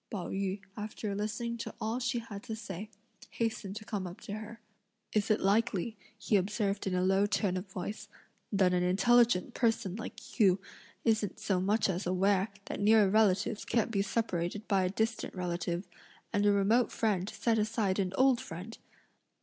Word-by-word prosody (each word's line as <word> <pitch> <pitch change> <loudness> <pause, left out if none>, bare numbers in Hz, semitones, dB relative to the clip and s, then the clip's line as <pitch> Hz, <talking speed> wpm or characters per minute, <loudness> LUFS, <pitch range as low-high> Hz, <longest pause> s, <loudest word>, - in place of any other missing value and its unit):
Pao 190 -5 -4
yü, 195 0 -2
after 210 -1 -4
listening 215 +3 -2
to - - -6
all 225 +3 -1
she 245 0 0
had 215 -4 -6
to 220 - -4
say, 210 -2 -7 0.4
hastened 220 -4 -2
to 215 - -7
come 200 -4 -3
up 175 - -9
to 205 - -6
her. 220 +2 -7 0.5
"Is 215 0 +1
it 215 - +3
likely," 215 +1 +1 0.2
he 210 - +2
observed 200 +1 -1
in 185 - 0
a 180 - +1
low 195 +2 +3
tone 200 -3 0
of 185 +2 -4
voice, 205 +4 -5 0.4
"that 190 -3 +3
an 180 - +2
intelligent 215 +4 +4
person 225 -6 +1
like 225 +2 -9
you 195 -3 +5 0.5
isn't 220 -4 +1
so 190 -3 0
much 210 +3 +2
as 185 -1 -2
aware 190 +2 +2 0.2
that - - -5
near 210 0 +6
relatives 210 -1 +3
can't 230 -1 0
be 200 -3 +1
separated 200 -1 -2
by 195 -2 +3
a - - +1
distant 220 +3 -2
relative, 175 0 -2 0.5
and 205 0 +3
a - - +6
remote 205 +5 +3
friend 205 -4 0
set 225 -1 +1
aside 210 -3 0
an 185 -2 0
old 260 -1 +4
friend! 225 -4 -8
205 Hz, 175 wpm, -31 LUFS, 190-225 Hz, 0.5 s, near